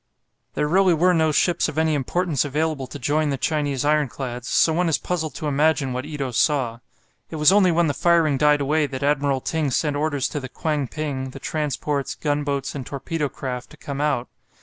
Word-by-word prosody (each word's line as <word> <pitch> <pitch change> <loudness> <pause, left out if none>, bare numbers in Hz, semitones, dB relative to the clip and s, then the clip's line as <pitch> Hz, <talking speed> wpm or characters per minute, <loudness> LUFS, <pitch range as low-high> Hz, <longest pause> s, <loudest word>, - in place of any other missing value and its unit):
There 150 - 0
really 185 +2 +4
were 180 +3 +3
no 160 -2 +2
ships 175 +3 +2
of 155 - -8
any 160 0 +2
importance 150 +2 0
available 150 -1 -2
to 130 - -8
join 145 +3 0
the 140 - -1
Chinese 145 -1 -1
ironclads, 135 -4 -1
so 160 - +3
one 175 +1 +1
is 160 - +2
puzzled 160 -6 -3
to - - -5
imagine 145 -2 +1
what 130 +3 -4
Ito 145 -4 -4
saw. 120 0 +1 0.5
It - - -7
was 150 +3 +5
only 195 -3 +5
when 170 +1 +3
the 145 - 0
firing 165 -2 +3
died 150 +1 +3
away 150 +2 +1
that 135 0 -5
Admiral 140 -2 +1
Ting 155 0 -1
sent 145 +2 0
orders 145 -2 0
to 150 - -3
the 130 -2 -7
"Kwang 150 -1 -2
ping," 135 -2 -4
the 135 - -10
transports, 150 -1 -2
gunboats, 145 -2 -2
and 140 - -5
torpedo 145 +3 -3
craft 125 -2 -6
to - - -15
come 140 0 -5
out. 145 -5 0
145 Hz, 200 wpm, -23 LUFS, 135-155 Hz, 0.5 s, was